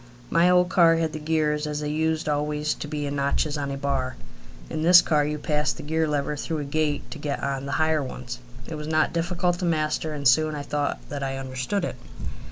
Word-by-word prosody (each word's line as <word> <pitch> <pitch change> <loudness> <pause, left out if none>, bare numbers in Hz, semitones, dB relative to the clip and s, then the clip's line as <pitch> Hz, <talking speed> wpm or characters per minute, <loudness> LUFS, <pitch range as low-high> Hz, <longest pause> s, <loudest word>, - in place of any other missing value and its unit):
My 170 +2 +5
old 180 0 +5
car 170 -3 +5
had 165 -1 0
the 155 - -4
gears 150 -1 0
as 150 0 -3
they 150 - -2
used 160 +1 0
always 150 0 0
to - - -7
be 150 -1 -3
in 140 0 -3
notches 140 +2 0
on 140 -2 -2
a 140 - -3
bar. 135 -2 -1 0.5
In 155 - -3
this 175 +2 +9
car 150 -4 +2
you 150 +1 -1
passed 150 -5 0
the - - -7
gear 160 +2 0
lever 150 0 -1
through 160 +2 -3
a 150 - -2
gate 145 0 -1
to 150 - -7
get 145 -1 -3
on 140 0 -2
the 140 - -3
higher 155 -1 +2
ones. 125 -2 -6 0.3
It - - -7
was 150 -1 -5
not 155 +1 +2
difficult 175 +1 0
to 180 - -1
master, 155 -1 0
and 140 -2 +1
soon 155 +5 +4
I 145 - -4
thought 145 0 -2
that 145 -1 -4
I 135 -1 -2
understood 135 +8 -2
it. 125 - -5
150 Hz, 230 wpm, -25 LUFS, 140-160 Hz, 0.5 s, this